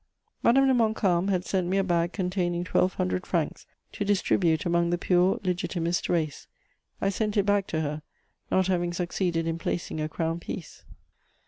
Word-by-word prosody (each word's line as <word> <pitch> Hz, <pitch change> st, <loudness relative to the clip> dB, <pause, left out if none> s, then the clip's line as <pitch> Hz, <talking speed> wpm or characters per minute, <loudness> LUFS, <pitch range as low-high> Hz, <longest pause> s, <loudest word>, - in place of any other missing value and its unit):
Madame 270 Hz, +3 st, +5 dB
de 265 Hz, -, +4 dB
Montcalm 215 Hz, -6 st, +2 dB
had 185 Hz, -2 st, 0 dB
sent 185 Hz, -2 st, 0 dB
me 190 Hz, +2 st, +1 dB
a 195 Hz, -, +3 dB
bag 175 Hz, -2 st, +1 dB
containing 180 Hz, -2 st, -1 dB
twelve 180 Hz, +1 st, +1 dB
hundred 90 Hz, 0 st, -1 dB
francs -, -, -2 dB, 0.2 s
to -, -, -3 dB
distribute 185 Hz, -5 st, +2 dB
among 170 Hz, 0 st, +2 dB
the 175 Hz, -, +1 dB
pure 180 Hz, +1 st, +2 dB
Legitimist 175 Hz, -2 st, -1 dB
race: 160 Hz, -4 st, -1 dB, 0.5 s
I 195 Hz, -, +1 dB
sent 210 Hz, +1 st, -1 dB
it 200 Hz, -, +3 dB
back 205 Hz, -1 st, +2 dB
to 160 Hz, -, -1 dB
her, 150 Hz, 0 st, -3 dB, 0.5 s
not 190 Hz, 0 st, +3 dB
having 175 Hz, -2 st, 0 dB
succeeded 175 Hz, -1 st, -1 dB
in 165 Hz, 0 st, -2 dB
placing 170 Hz, -2 st, -3 dB
a 155 Hz, -, -2 dB
crown 165 Hz, +1 st, -2 dB
piece. 170 Hz, -1 st, -8 dB
175 Hz, 175 wpm, -27 LUFS, 170-195 Hz, 0.5 s, Madame